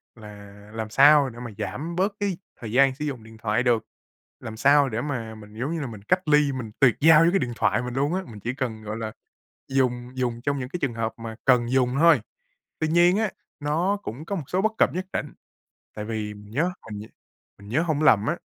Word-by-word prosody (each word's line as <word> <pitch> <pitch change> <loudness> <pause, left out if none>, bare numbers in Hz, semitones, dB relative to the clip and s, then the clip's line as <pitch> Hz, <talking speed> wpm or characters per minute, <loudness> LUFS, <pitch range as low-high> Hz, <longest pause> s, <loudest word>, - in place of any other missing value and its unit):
là 105 -3 -12 0.2
làm 110 -1 -4
sao 140 +3 +6
để 120 -1 -11
mà 120 -2 -7
giảm 165 +5 -4
bớt 195 +3 +1
cái 200 -4 -1 0.2
thời 115 -3 -6
gian 135 +2 +4
sử 150 - -4
dụng 130 -6 -4
điện 110 0 -14
thoại 110 +2 0
được, 115 -3 +2 0.5
làm 110 0 -8
sao 140 +3 +5
để 115 0 -2
mà 115 -6 -4
mình, 105 -1 -13
giống 135 +5 -2
như 165 - -3
là, 140 - -3
mình 110 -4 -9
cách 185 -1 +1
ly, 150 -1 +4
mình 125 -5 -5
tuyệt 125 -5 +5
giao 160 0 +7
với 165 - +5
cái 195 - +2
điện 120 - -2
thoại 120 - +1
mình 125 0 -5
luôn 140 +5 0
á, 190 +1 -1
mình 110 -4 -10
chỉ 120 +5 -3
cần, 125 -5 -4
gọi 110 +1 -5
là, 110 -1 -4 0.6
dùng 125 -2 0
dùng 120 -2 -2
trong 140 +2 -1
những 125 -1 -5
cái 180 - -4
trường 135 -4 0
hợp 115 0 -2
mà 115 -1 -7
cần 125 -3 +4
dùng 130 -1 +2
thôi. 165 -6 +6 0.6
Tuy 160 - 0
nhiên 175 +4 +4
á, 215 -2 0 0.3
nó 165 +7 0
cũng 135 +8 -6
có 200 - -3
một 165 - -3
số 185 - 0
bất 220 +1 +2
cập - - +3
nhất 185 +1 -3
định. - - -3 0.6
Tại 105 - -5
vì 105 -1 -4
mình 105 0 -13
nhớ 165 +10 +1 0.2
mình 105 - -5
nh 110 - -10 0.5
mình 100 0 -13
nhớ 135 +8 +2
hổng 155 -3 0
lầm 110 -8 +5
á, 170 - 0
130 Hz, 245 wpm, -25 LUFS, 110-155 Hz, 0.6 s, giao